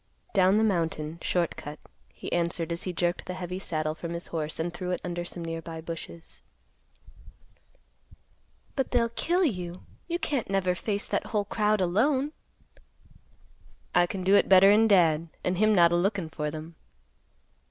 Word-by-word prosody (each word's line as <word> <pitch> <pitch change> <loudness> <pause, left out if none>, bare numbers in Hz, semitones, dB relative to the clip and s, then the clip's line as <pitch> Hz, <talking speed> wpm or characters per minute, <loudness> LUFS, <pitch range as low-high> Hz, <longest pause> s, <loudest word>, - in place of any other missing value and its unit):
"Down 190 0 +4
the 220 - +3
mountain; 165 -5 -1
short 175 -2 0
cut;" 150 +1 -8 0.3
he - - -8
answered 170 -1 0
as 170 - -2
he 185 - -3
jerked 175 0 -1
the 180 - -4
heavy 180 0 -5
saddle 155 -4 -2
from 170 +1 -6
his 170 - -2
horse 155 -1 -2
and 170 +2 -2
threw 180 +1 -5
it 180 - -1
under 175 -1 -3
some 175 -1 -7
nearby 165 0 -5
bushes. 165 0 -8 2.3
"But 270 - 0
they'll 235 -2 +2
kill 350 +10 +1
you. 180 - -3 0.2
You 345 0 -1
can't 290 - -2
never 190 -2 +1
face 205 +3 -2
that - - -1
whole 210 -3 0
crowd 210 0 +1
alone." 260 +11 +2 1.6
"I 175 0 +4
can 185 +1 -4
do 190 +2 +3
it - - +4
better'n 200 +4 +7
Dad, 170 -5 +4 0.2
and 180 0 0
him 215 0 +4
not 170 -2 +6
a - - +3
lookin' 190 -1 0
for 150 -1 -3
them." 160 +2 -8
180 Hz, 165 wpm, -28 LUFS, 170-205 Hz, 2.3 s, better'n